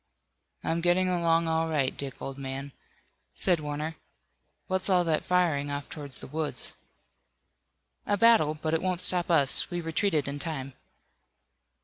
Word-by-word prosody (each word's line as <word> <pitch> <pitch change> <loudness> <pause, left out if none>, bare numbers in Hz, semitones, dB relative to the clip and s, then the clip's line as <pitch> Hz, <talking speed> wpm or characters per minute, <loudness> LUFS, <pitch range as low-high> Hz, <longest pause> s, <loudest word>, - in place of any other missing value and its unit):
"I'm 165 +1 -1
getting 175 +2 +2
along 170 -2 +2
all 160 0 0
right, 140 -4 0
Dick, 140 -2 -7
old 135 0 -6
man," 135 +1 -5 0.6
said 180 -3 +2
Warner. 150 +2 -4 0.7
"What's 190 +1 0
all 180 -2 +4
that 160 -2 0
firing 165 -6 +1
off 145 0 -5
toward 145 -3 -8
the - - -8
woods?" 155 +1 -4 1.3
"A 205 - +1
battle, 220 -9 +5
but 155 0 -2
it 165 - +1
won't 185 -2 -1
stop 180 0 +5
us. 145 -6 +4
We 175 -1 -3
retreated 165 -2 0
in 140 +1 -4
time." 135 -4 -4
160 Hz, 145 wpm, -28 LUFS, 145-175 Hz, 1.3 s, battle